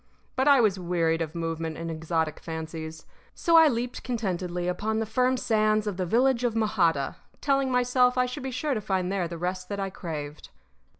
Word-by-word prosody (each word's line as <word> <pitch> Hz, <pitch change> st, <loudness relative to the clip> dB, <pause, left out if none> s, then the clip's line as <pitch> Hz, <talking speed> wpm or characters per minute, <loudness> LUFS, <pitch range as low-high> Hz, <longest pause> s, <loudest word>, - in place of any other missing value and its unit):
But 265 Hz, +2 st, +1 dB
I 280 Hz, -3 st, +7 dB
was 200 Hz, -4 st, +2 dB
wearied 170 Hz, -2 st, 0 dB
of 160 Hz, 0 st, -4 dB
movement 165 Hz, -1 st, -3 dB
and 165 Hz, 0 st, -4 dB
exotic 160 Hz, -1 st, -2 dB
fancies; 160 Hz, 0 st, -6 dB, 0.3 s
so 335 Hz, -, +2 dB
I 325 Hz, -1 st, +9 dB
leaped 245 Hz, -2 st, -2 dB
contentedly 180 Hz, -7 st, -2 dB
upon 215 Hz, +4 st, -1 dB
the 225 Hz, -, 0 dB
firm 255 Hz, +4 st, +1 dB
sands 215 Hz, -2 st, +2 dB
of 205 Hz, -3 st, -3 dB
the 185 Hz, -2 st, -1 dB
village 250 Hz, +4 st, +3 dB
of 235 Hz, -2 st, 0 dB
Mojada, 175 Hz, -11 st, +1 dB, 0.2 s
telling 275 Hz, -2 st, +1 dB
myself 250 Hz, 0 st, +3 dB
I 250 Hz, -, +4 dB
should 250 Hz, -, -5 dB
be 265 Hz, -, -3 dB
sure 280 Hz, +3 st, -1 dB
to 215 Hz, -, -2 dB
find 190 Hz, -2 st, -1 dB
there 190 Hz, -3 st, 0 dB
the 170 Hz, 0 st, -6 dB
rest 180 Hz, +1 st, -3 dB
that 200 Hz, -1 st, -3 dB
I 195 Hz, -1 st, -2 dB
craved. 150 Hz, -5 st, -6 dB
195 Hz, 195 wpm, -27 LUFS, 165-245 Hz, 0.3 s, I